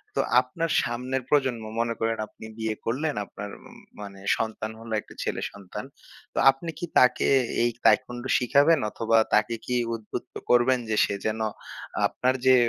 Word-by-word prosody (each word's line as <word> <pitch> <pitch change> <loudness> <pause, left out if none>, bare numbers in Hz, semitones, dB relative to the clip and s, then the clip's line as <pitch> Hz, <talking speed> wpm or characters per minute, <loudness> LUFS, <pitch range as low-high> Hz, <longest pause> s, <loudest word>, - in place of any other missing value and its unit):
তো - - 0 0.2
আপনার 165 +7 -3
সামনের 125 +2 -2
প্রজন্ম, 130 -6 +2 0.2
মনে 115 0 +1
করেন 115 0 0
আপনি 110 - -13
বিয়ে 110 -1 -2
করলেন 145 +6 -1
আপনার 100 +1 -8 0.2
উম - - -15 0.2
মানে 100 -1 -9 0.2
সন্তান 110 -1 -3
হলো, 115 -1 -7
একটা - - -16
ছেলে - - -2
সন্তান। 100 -3 -8 0.5
তো - - -11
আপনি 135 +5 -8
কি - - -2
তাকে 125 0 +4 0.3
এই 120 - +3
taekwondo 125 0 +2
শিখাবেন? 145 +6 +4
অথবা 115 +1 +1 0.2
তাকে 105 +2 +3
কি 125 - -1 0.2
উদ্বুদ্ধ 110 -2 -7 0.2
করবেন 125 +1 +4
যে 110 - +1
সে 100 - -3
যেন 110 0 -1 0.7
আপনার 130 +1 0
যে 130 0 +7
120 Hz, 160 wpm, -26 LUFS, 110-130 Hz, 0.7 s, যে